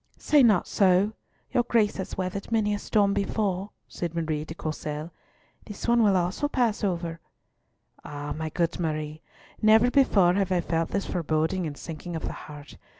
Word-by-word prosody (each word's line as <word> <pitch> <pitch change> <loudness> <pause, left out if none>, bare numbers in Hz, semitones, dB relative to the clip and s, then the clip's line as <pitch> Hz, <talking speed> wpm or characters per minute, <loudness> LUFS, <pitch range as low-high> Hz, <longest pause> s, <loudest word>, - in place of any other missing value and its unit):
"Say 295 -2 +4
not 215 -8 +4
so; 195 +2 +3 0.4
your 250 - +3
Grace 230 -3 +1
has 190 - -5
weathered 190 +3 -4
many 215 -2 +2
a 205 - -2
storm 200 -1 +2
before," 200 -1 -1 0.2
said 170 -1 -5
Marie 155 -2 -1
de 160 +1 -8
Courcelles. 155 0 -5 0.6
"This 210 +2 -7
one 235 0 +4
will 200 -3 +4
also 180 +11 0
pass 240 -7 0
over." 170 -4 -2 0.8
"Ah, 145 0 -5
my 160 0 -3
good 170 +3 -1
Marie, 155 -2 -3 0.4
never 220 +3 +5
before 200 -11 +4
have 195 -1 0
I 180 - +3
felt 165 -1 -1
this 200 - -2
foreboding 160 +1 -1
and 145 -2 -7
sinking 170 +1 -7
of 160 - -4
the - - -3
heart. 145 -1 -11
185 Hz, 170 wpm, -26 LUFS, 160-210 Hz, 0.8 s, never